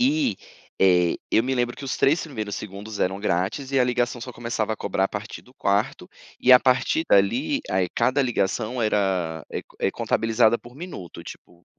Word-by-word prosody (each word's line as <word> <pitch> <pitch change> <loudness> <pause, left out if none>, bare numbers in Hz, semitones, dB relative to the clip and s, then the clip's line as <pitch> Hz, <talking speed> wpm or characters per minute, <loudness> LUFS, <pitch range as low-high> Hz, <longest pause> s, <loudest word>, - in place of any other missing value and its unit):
E, 275 +1 +2 0.4
eh, 90 -3 +4
eu 110 - +4
me 130 +1 -1
lembro 120 -1 -1
que 140 - -8
os 130 - -2
3 155 +5 +3
primeiros 110 -9 -5
segundos 105 +1 -7
eram 95 +2 0
grátis 105 +8 -1
e 135 - +3
a 125 - +4
ligação 120 0 -1
só 125 +2 -7
começava 115 -2 -2
a - - -4
cobrar 95 - -1
a - - +1
partir 105 +2 -7
do 125 - -21
4º, 100 -2 -1 0.3
e 130 - +6
a 125 - +10
partir 130 +5 +2
dali 120 - +3
a - - 0 0.2
cada 135 +2 +2
ligação 120 0 -1
era 95 -7 0
é - - -3 0.2
é - - +2
contabilizada 115 +1 +2
por 120 +1 -15
minuto, 145 - -8
tipo 85 0 -13
115 Hz, 190 wpm, -24 LUFS, 100-130 Hz, 0.4 s, a